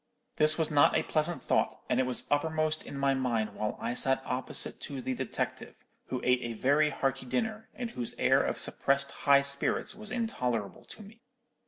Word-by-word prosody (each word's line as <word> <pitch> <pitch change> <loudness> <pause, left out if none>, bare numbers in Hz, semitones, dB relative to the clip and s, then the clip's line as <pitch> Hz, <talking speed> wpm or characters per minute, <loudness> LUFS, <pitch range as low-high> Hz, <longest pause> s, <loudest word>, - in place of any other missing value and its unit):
"This 155 0 +5
was 160 -2 0
not 145 -1 +5
a - - +1
pleasant 160 +2 -1
thought, - - +1
and 125 - +1
it 130 - +2
was 125 - +2
uppermost 155 +1 +1
in 140 - -7
my 140 0 +2
mind 120 -5 -1
while 110 - -3
I 120 - -2
sat 135 +2 +2
opposite 130 0 -1
to 140 -2 -6
the 130 0 -2
detective, 130 -1 -4 0.3
who 130 - -3
ate 125 0 +3
a 120 -1 -4
very 145 +7 +3
hearty 135 -2 -2
dinner, 220 - -2
and 240 -2 -5
whose 120 -2 -5
air - - +4
of - - -2
suppressed 140 0 +1
high 140 -1 +4
spirits 140 0 -1
was 215 0 -10
intolerable 125 - -2
to 215 - -11
me. 220 +3 -16
140 Hz, 190 wpm, -30 LUFS, 125-155 Hz, 0.3 s, This